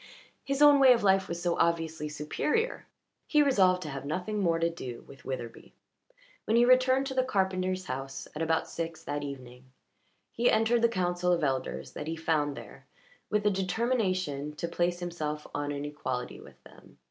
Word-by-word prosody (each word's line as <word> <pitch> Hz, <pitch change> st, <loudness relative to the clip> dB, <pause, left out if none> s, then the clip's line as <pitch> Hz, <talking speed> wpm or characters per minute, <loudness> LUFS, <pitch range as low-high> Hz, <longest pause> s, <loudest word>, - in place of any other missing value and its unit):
His 275 Hz, +1 st, +1 dB
own 290 Hz, -1 st, +8 dB
way 265 Hz, -2 st, +8 dB
of 235 Hz, -, -1 dB
life 195 Hz, -1 st, +3 dB
was 170 Hz, -, -4 dB
so 175 Hz, 0 st, -1 dB
obviously 165 Hz, -2 st, 0 dB
superior. 300 Hz, -, -2 dB, 0.4 s
He 300 Hz, -1 st, +4 dB
resolved 185 Hz, -9 st, +3 dB
to 155 Hz, -, -6 dB
have 135 Hz, -1 st, -6 dB
nothing 180 Hz, +8 st, -3 dB
more 170 Hz, -3 st, +2 dB
to 165 Hz, 0 st, +1 dB
do 130 Hz, -8 st, -7 dB
with 135 Hz, -1 st, -14 dB
Witherbee. 120 Hz, -3 st, -6 dB, 0.7 s
When 225 Hz, -, +2 dB
he 240 Hz, -, +6 dB
returned 255 Hz, +1 st, +4 dB
to 270 Hz, -, -4 dB
the 260 Hz, -, +3 dB
carpenter's 185 Hz, -5 st, -1 dB
house 135 Hz, -2 st, -5 dB
at 155 Hz, -, -4 dB
about 160 Hz, 0 st, +1 dB
six 165 Hz, -1 st, -5 dB
that 145 Hz, -2 st, -3 dB
evening 130 Hz, -3 st, -8 dB, 0.7 s
he 240 Hz, +1 st, +2 dB
entered 225 Hz, +2 st, +3 dB
the 235 Hz, -, +4 dB
council 180 Hz, -3 st, 0 dB
of 170 Hz, -2 st, +1 dB
elders 70 Hz, -, -2 dB
that 150 Hz, -, -7 dB
he 165 Hz, -, -2 dB
found 155 Hz, -3 st, 0 dB
there 135 Hz, -, -12 dB, 0.4 s
with 210 Hz, 0 st, +1 dB
the 210 Hz, -, +3 dB
determination 185 Hz, -, -1 dB
to 170 Hz, -, -3 dB
place 175 Hz, +1 st, -1 dB
himself 155 Hz, -4 st, -4 dB
on 145 Hz, 0 st, -2 dB
an 145 Hz, 0 st, -4 dB
equality 130 Hz, -4 st, -4 dB
with -, -, -16 dB
them. -, -, -18 dB
170 Hz, 180 wpm, -29 LUFS, 145-210 Hz, 0.7 s, own